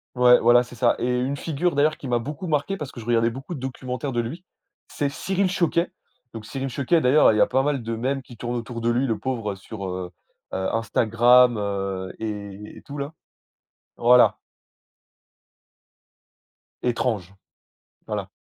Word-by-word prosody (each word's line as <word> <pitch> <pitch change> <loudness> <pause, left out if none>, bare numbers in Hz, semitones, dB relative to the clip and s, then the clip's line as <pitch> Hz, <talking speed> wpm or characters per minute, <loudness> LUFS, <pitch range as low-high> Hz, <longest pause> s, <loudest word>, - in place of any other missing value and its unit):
Ouais, 125 0 +6
voilà, 120 +1 +5
c'est 120 - -14
ça 120 0 +3
et - - -2
une 125 +3 0
figure, 165 +1 -1
d'ailleurs, 150 +2 +2
qui 135 - -8
m'a 120 -1 +2
beaucoup 150 +9 -5
marqué 155 +6 0
parce 145 -3 -6
que - - -10
je 110 - -9
regardais 115 -1 +2
beaucoup 135 +8 -7
de 140 - -6
documentaires 130 +1 -4
de 120 - -1
lui, 155 +11 -6 0.4
c'est 145 - -2
Cyril 190 +6 -1
Chauquet. 170 -1 +1 0.4
Donc 110 -2 -8
Cyril 135 0 -4
Chauquet, 140 +6 +1
d'ailleurs, 140 +2 +5
heu, 110 - +3
il - - +1
y - - +4
a - - +7
pas 130 +1 +2
mal 140 -3 -1
de 115 0 -3
mèmes 135 +4 -1
qui 120 - -13
tournent 120 +2 -4
autour 115 0 -5
de 115 - +1
lui, 120 +3 +2
le 115 -4 0
pauvre, 115 -6 -2
heu, - - -6
sur, 100 +1 -8
heu 90 -1 -5 0.4
heu, 95 0 -2
Instagram, 120 +2 +4
heu, 95 -2 -3
et 105 -1 -6
et - - -12
tout, 145 0 -9
là. 140 +3 -4 0.8
Voilà. 125 +1 +5 2.5
Étrange, 110 -6 -1 0.7
voilà. - - -3
125 Hz, 180 wpm, -24 LUFS, 115-140 Hz, 2.5 s, a